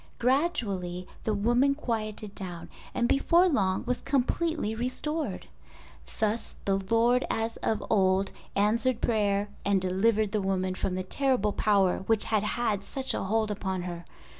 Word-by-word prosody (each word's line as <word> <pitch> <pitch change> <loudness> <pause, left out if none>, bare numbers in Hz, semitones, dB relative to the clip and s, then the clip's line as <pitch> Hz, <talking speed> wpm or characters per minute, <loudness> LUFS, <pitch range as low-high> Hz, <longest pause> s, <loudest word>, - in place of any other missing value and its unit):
Gradually 210 - 0 0.2
the 220 - +1
woman 240 +7 +3
quieted 215 -6 -3
down 180 -4 -7 0.2
and 240 -1 0
before 335 +8 +4
long 195 - +1
was 250 0 -1
completely 275 -1 0
restored. 280 +7 -3 0.7
Thus 220 +1 -1
the 195 -1 +2
Lord 240 +2 +4
as 225 +1 -1
of 220 -2 -1
old 190 -2 +2 0.2
answered 225 +4 +2
prayer 205 -2 +1
and 200 -1 +3
delivered 200 +3 +1
the 215 -1 0
woman 185 -1 0
from 185 0 -2
the 185 - -2
terrible 245 -1 +1
power 200 -4 +2
which 225 -2 +3
had 215 -2 +1
had 210 -2 -1
such 265 +6 -3
a - - -2
hold 215 +2 0
upon 190 -3 -3
her. 175 -1 -6
215 Hz, 145 wpm, -28 LUFS, 195-245 Hz, 0.7 s, before